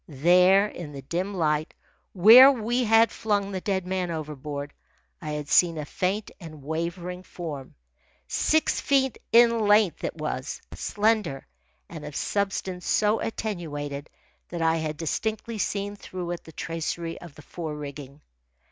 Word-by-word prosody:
There, 180 +7 +5
in 170 -7 -8
the 135 -1 -8
dim 185 +7 -3
light, 155 -2 0 0.4
where 230 +9 +9
we 240 0 -1
had 225 +1 +5
flung 205 -2 -1
the 190 -1 -4
dead 190 -2 -1
man 185 -1 -2
overboard, 150 -2 -5 0.5
I 155 - -6
had 150 -1 -4
seen 165 +2 +4
a 150 - -4
faint 190 +7 -2
and 155 -5 -11
wavering 170 +4 -4
form. 155 -7 -8 0.5
Six 315 0 +1
feet 265 -2 +1
in 235 0 +6
length 205 -5 +3
it - - -3
was, 155 -4 -4
slender, 210 -9 0 0.4
and - - -9
of - - -8
substance 195 -3 -2
so 210 +1 +2
attenuated 150 -10 -4 0.4
that 170 -1 -3
I 165 0 +3
had 155 -1 -3
distinctly 220 +7 -3
seen 200 0 -2
through 180 -3 -6
it 175 - -6
the 160 - -11
tracery 165 +1 -4
of 170 -5 -12
the 155 - -13
fore 160 0 -6
rigging. 145 -1 -9
175 Hz, 145 wpm, -26 LUFS, 155-205 Hz, 0.5 s, where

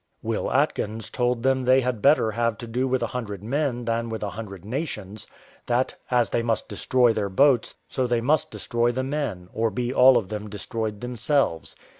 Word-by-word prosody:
Will - - -2
Atkins 110 +1 0
told 125 -1 0
them 130 0 +2
they 130 +1 +5
had 125 -4 -2
better 140 -5 +4
have 115 0 0
to 120 - -7
do 125 +3 -1
with 130 0 0
a - - -3
hundred 105 -6 -5
men 125 0 -1
than 115 0 -1
with 110 -1 -4
a 100 - -3
hundred 100 -3 -8
nations; 110 - -5 0.4
that, 125 +2 +1 0.2
as 120 -2 +2
they 120 - +1
must 115 -2 -1
destroy 125 -3 +2
their 105 -2 -1
boats, 130 +3 +3
so 130 -2 -1
they 120 -1 +1
must 145 +7 +1
destroy 120 0 0
the 130 +2 -2
men, 130 -11 -3
or 115 0 +1
be 120 +4 -2
all 130 -1 +7
of 110 -5 -1
them 105 0 -5
destroyed 105 +1 -4
themselves. 125 - -1
120 Hz, 195 wpm, -25 LUFS, 110-130 Hz, 0.4 s, all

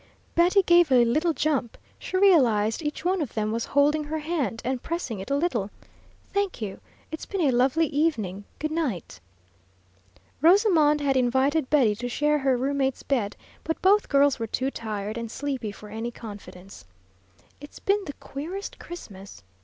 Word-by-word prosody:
Betty 360 +4 +4
gave 345 -4 +5
a 245 -2 +6
little 310 +9 +2
jump; 285 -5 -1 0.2
she 370 - -3
realized 245 - +4
each 300 +1 -4
one 370 0 +1
of 285 - -4
them 215 -1 -1
was 230 +1 -2
holding 295 +2 +2
her 310 +2 -3
hand 300 -7 -2
and 255 0 -1
pressing 325 - -4
it 190 - -7
a 280 - +1
little. 265 - 0 0.6
"Thank 400 -2 -1
you, 200 -4 -5 0.3
it's 315 - -6
been 395 -2 -2
a 285 -5 +3
lovely 260 +7 +3
evening. 225 - -1
Goodnight." 310 - -3 1.2
Rosamond 325 -4 +4
had 275 -2 +1
invited 260 +3 +2
Betty 260 -8 +4
to 245 +2 -4
share 295 +4 +1
her 265 -2 +2
roommate's 270 +1 -1
bed, 235 -8 -1 0.3
but 320 - -3
both 405 +2 +4
girls 280 -2 +3
were 225 - -2
too 260 +5 -2
tired 215 -1 -4
and 230 -1 -5
sleepy 265 -4 -4
for 210 +1 -12
any 225 +3 -4
confidence. 205 -5 -11 0.8
"It's 290 +1 -12
been 405 +1 +1
the 290 - -6
queerest 340 +11 -7
Christmas!" 195 - -10
275 Hz, 160 wpm, -25 LUFS, 230-320 Hz, 1.2 s, a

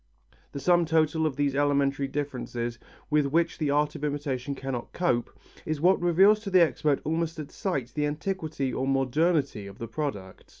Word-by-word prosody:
The 140 - -5
sum 175 +3 +3
total 160 0 +2
of 145 - -3
these 145 -1 0
elementary 140 -1 +1
differences 125 -4 -4 0.3
with 150 -1 +3
which 165 +4 0
the 150 -3 0
art 145 +1 +2
of - - -8
imitation 145 -2 -2
cannot 135 -3 -5
cope, 125 -10 0 0.3
is 155 -1 -3
what 180 +4 +4
reveals 190 +5 +5
to 210 -2 -6
the 185 -2 +6
expert 150 -3 +1
almost 165 +1 -1
at 150 -2 -7
sight 140 - -3
the 150 0 0
antiquity 155 -4 -3
or 130 - -1
modernity 135 - +1
of 100 0 -11
the 115 - -6
product. 115 -7 -5
145 Hz, 175 wpm, -27 LUFS, 135-165 Hz, 0.3 s, the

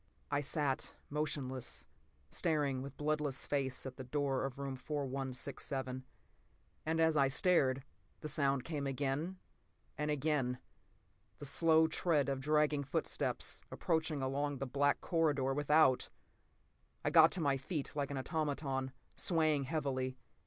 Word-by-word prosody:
I 145 0 +2
sat 145 -2 -1 0.2
motionless, 140 -4 -3 0.5
staring 145 -6 +1
with 140 +1 -8
bloodless 150 -2 -1
face 135 -3 -1
at 130 -1 -6
the 130 - -5
door 135 0 0
of 135 -1 -5
room 140 -1 -3
4167. 130 -1 -3 0.8
And 160 +1 +1
as 160 -1 +4
I 140 -2 +5
stared, 135 -3 +4 0.4
the - - -4
sound 140 -4 +1
came 145 -4 -3
again, 140 +7 -1 0.6
and 150 0 0
again—the 145 -1 -4
slow 160 +3 +4
tread 155 -3 +1
of 135 -1 -1
dragging 150 +1 +2
footsteps, 140 - -2
approaching 160 -4 0
along 140 +2 -1
the 135 - -3
black 140 +2 +2
corridor 145 -6 +1
without! 145 -1 +4 1.0
I - - +2
got 160 -1 +8
to 190 - 0
my 140 -4 +2
feet 140 +2 -3
like 140 -2 -1
an 140 - -3
automaton, 135 -2 -2 0.2
swaying 155 -5 +2
heavily. 130 -3 -1
140 Hz, 130 wpm, -35 LUFS, 135-155 Hz, 1.0 s, got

